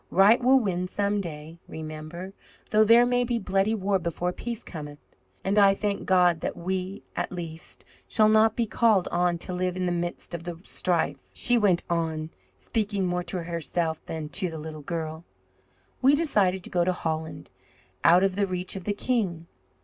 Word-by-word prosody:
Right 200 +6 +5
will 265 +2 +6
win 185 -5 -1
some 200 +2 0
day, 160 -1 -8
Remember, 155 +4 -7 0.4
though 215 0 +5
there 230 +3 +6
may 245 0 +2
be 240 -1 -1
bloody 195 +1 +1
war 195 -1 0
before 175 +1 -2
peace 235 +2 -5
cometh. 150 -3 -8 0.5
And 200 +2 +2
I 195 -1 +6
thank 205 0 -2
God 180 -3 +4
that - - -3
we, 185 +2 -3
at - - -2
least, 165 -3 -8 0.2
shall 215 -1 +3
not 220 0 +4
be 235 - +1
called 215 -3 +2
on 175 0 +1
to 180 +2 -5
live 180 0 -1
in 185 - -1
the 175 - 0
midst 175 0 -3
of 170 -1 -5
the 175 -1 -6
strife," 165 -9 -1
she 245 - +3
went 200 -7 +3
on, 160 -2 -2 0.3
speaking 205 -3 -1
more 180 0 0
to 175 0 -2
herself 165 -1 -2
than 155 -2 -5
to 185 +2 -1
the 160 - -7
little 155 0 -7
girl. 160 +1 -4 0.8
"We 270 +2 +6
decided 200 - +1
to - - -9
go 175 -1 +2
to 185 +1 +1
Holland, 160 -2 -4 0.5
out 175 +3 +6
of 195 -1 +1
the 200 0 +1
reach 185 0 -4
of 190 - -7
the 205 - 0
king. 200 -7 -1
180 Hz, 185 wpm, -26 LUFS, 170-205 Hz, 0.8 s, will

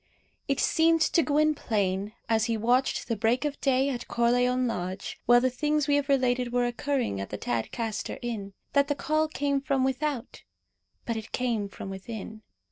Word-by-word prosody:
It 275 -2 0
seemed 330 0 +3
to 335 - +4
Gwynplaine, 220 - +1
as 225 -1 +2
he 230 -1 0
watched 245 +4 +1
the 230 - 0
break 230 +6 +1
of 290 -1 -3
day 270 0 +3
at 245 -3 -4
Corleone 245 +2 +2
Lodge, 185 -4 -4
while 240 +1 +7
the 255 0 +2
things 300 +3 0
we 290 - +3
have 285 0 -2
related 250 -2 +2
were 245 0 +2
occurring 240 - -1
at 100 - -5
the 105 - -4
Tadcaster 205 - -3
Inn, 210 -5 -4 0.2
that 280 0 +4
the 290 - 0
call 310 +2 +1
came 285 -2 -1
from 275 -1 +1
without; 265 -1 -2 0.6
but 230 -1 -2
it 220 -1 -7
came 230 -5 -1
from 195 0 -7
within. 215 +2 -7
245 Hz, 175 wpm, -28 LUFS, 220-280 Hz, 0.6 s, while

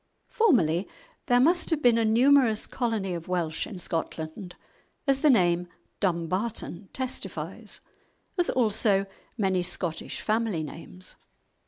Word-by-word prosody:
Formerly 195 - +3 0.4
there 245 0 +4
must 340 +7 +3
have 320 -3 +1
been 235 -2 +5
a - - +2
numerous 235 0 +4
colony 225 -7 -2
of 170 -1 -6
Welsh 170 -3 -1
in 200 - -8
Scotland, 165 +1 -4 0.5
as 275 -1 +2
the 305 - +5
name 175 -7 +3 0.3
"Dumbarton" 185 +2 -2
testifies, 260 -1 -5 0.5
as 355 -2 +1
also 215 -4 +2 0.3
many 190 -4 +1
Scottish 175 -2 -3
family 215 -6 0
names. 170 +4 -9
205 Hz, 120 wpm, -27 LUFS, 175-245 Hz, 0.5 s, been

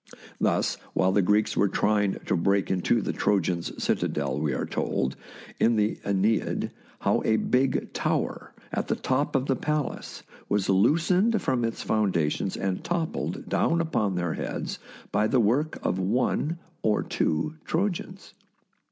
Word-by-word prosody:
Thus, - - +1 0.2
while 95 0 +3
the 100 - +3
Greeks 105 +3 +2
were 100 - +3
trying 105 -1 +2
to - - +1
break 100 +3 +1
into 90 -2 +2
the - - -2
Trojans' 90 -4 0
citadel, 70 0 0
we 75 -1 0
are 65 - -1
told, 65 0 -1 0.4
in 115 +1 +4
the 105 0 +1
" - - -28
iEneid," 100 +2 +1 0.3
how - - +2
a 110 - +3
big 130 +4 +1
tower - - -1 0.2
on - - 0
the - - +1
top 140 +3 0
of 135 -1 +2
the 135 - +1
palace 150 0 -3 0.3
was 100 -2 +1
loosened 170 - +3
from 130 -8 0
its 115 0 -2
foundations 95 -8 0
and 95 -1 -2
toppled 170 -1 -2
down 170 - +2
upon 110 - 0
their 90 -2 -1
heads - - -4 0.3
by 105 +1 +2
the 130 - +2
work 130 +8 +2
of 95 - 0
one 125 - 0 0.2
or 105 -1 +2
two 150 - -1
Trojans. 185 +1 -2
110 Hz, 150 wpm, -27 LUFS, 95-145 Hz, 0.4 s, in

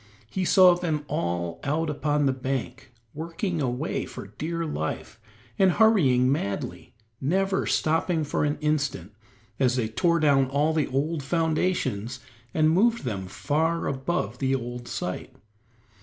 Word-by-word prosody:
He 190 -1 -1
saw 185 0 +7
them 160 -4 -2
all 85 -3 -2
out 160 +3 0
upon 150 0 0
the 135 - +3
bank, 130 0 -4 0.2
working 165 +2 -3
away 130 +4 -2
for - - -8
dear 165 +1 -2
life, 110 - -4 0.4
and 190 -2 +5
hurrying 140 - +4
madly, 100 -8 -3 0.3
never 190 +7 +1
stopping 160 0 +1
an 145 0 +1
instant, 145 - -1 0.5
as 125 -2 +3
they 120 -4 0
tore 170 +9 +1
down 140 -3 +4
all 145 +3 +1
the 155 -3 +1
old 145 +4 -1
foundations 155 - -1 0.3
and 155 +3 +3
moved 230 +7 +3
them 100 -7 -3
far 160 - 0
above 135 - -2
the 135 -1 +1
old 120 -1 -5
site. - - -5
145 Hz, 135 wpm, -26 LUFS, 130-165 Hz, 0.5 s, saw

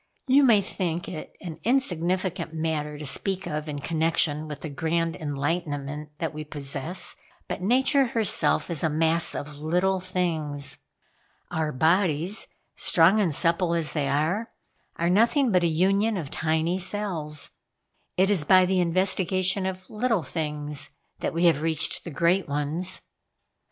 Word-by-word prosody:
You 270 +2 +5
may 225 -6 +6
think 175 -3 -3
it 155 -4 -7
an 165 -4 -7
insignificant 185 - 0
matter 155 -2 -2
to 150 - -7
speak 190 +7 0
of 150 +1 -4
in 145 - -4
connection 155 0 0
with 150 -1 -7
the 160 - -5
grand 165 +3 -1
enlightenment 150 0 -3
that 165 -2 -3
we 155 0 -5
possess; 145 +3 -2 0.3
but - - -4
Nature 265 +6 +3
herself 225 -5 +2
is 160 - 0
a 160 - +2
mass 160 +2 +2
of 145 0 -6
little 180 +5 +1
things. 160 -6 -2 0.7
Our 160 -1 -1
bodies, 165 +5 +1 0.3
strong 180 +4 +4
and 175 -8 +1
supple 170 +1 +1
as 165 -3 -2
they 145 -3 0
are, 160 +11 0 0.5
are 170 - -1
nothing 235 - +3
but 180 -2 +4
a 170 - +3
union 195 +6 +2
of 150 -6 -5
tiny 160 +3 0
cells. 175 -6 -2 0.7
It 190 +2 +3
is 185 -7 +2
by 185 +4 +6
the 185 0 +1
investigation 185 +2 +1
of 185 0 -6
little 220 -4 0
things 150 -1 -4 0.3
that - - -2
we 170 +2 +1
have 160 -4 +4
reached 160 -1 -1
the - - -5
great 170 +5 +1
ones." 150 +6 0
170 Hz, 150 wpm, -26 LUFS, 150-185 Hz, 0.7 s, may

